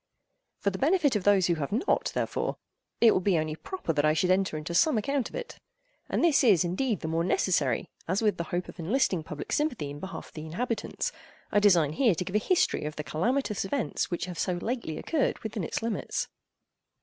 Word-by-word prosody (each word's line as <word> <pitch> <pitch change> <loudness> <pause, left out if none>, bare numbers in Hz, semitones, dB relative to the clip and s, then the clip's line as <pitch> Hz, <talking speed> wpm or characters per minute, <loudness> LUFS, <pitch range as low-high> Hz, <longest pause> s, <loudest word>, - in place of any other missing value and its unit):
For 200 - 0
the 190 - -6
benefit 305 -4 +3
of 205 - -1
those 200 -3 +5
who 175 - +3
have 140 - -3
not, 240 - +1
therefore, - - -1 0.4
it 230 -2 +8
will - - +3
be 185 -2 +2
only 155 -1 -1
proper 370 - -4
that 145 -1 +1
I 155 0 +4
should 180 +4 +2
enter 185 -4 +1
into 155 +3 -5
some 260 - +4
account 270 +4 0
of - - -11
it. - - -6 0.5
And - - 0
this 320 -5 +4
is 200 -9 +5
indeed 210 +6 -1
the 160 - -3
more 165 +1 0
necessary, 155 - +1 0.2
as 185 +4 +1
with 215 -2 +1
the 170 - -3
hope 175 +2 -3
of - - -11
enlisting 185 0 +1
public 150 -1 -7
sympathy 245 - 0
in 145 - -8
behalf 190 - -7
of - - -26
the 155 - -7
inhabitants, 235 - -2 0.4
I 205 - +4
design 175 -8 +4
here 225 +1 +3
to 180 - -3
give 185 - -5
a - - +5
history 350 - +1
of 150 0 -4
the 150 - -4
calamitous 220 - 0
events 225 +6 -1
which 175 - -2
have 180 -2 -7
so 185 - 0
lately 175 -3 -3
occurred 310 -5 0
within 220 -3 -3
its 165 - -3
limits. 230 -1 -2
190 Hz, 220 wpm, -28 LUFS, 165-240 Hz, 0.5 s, it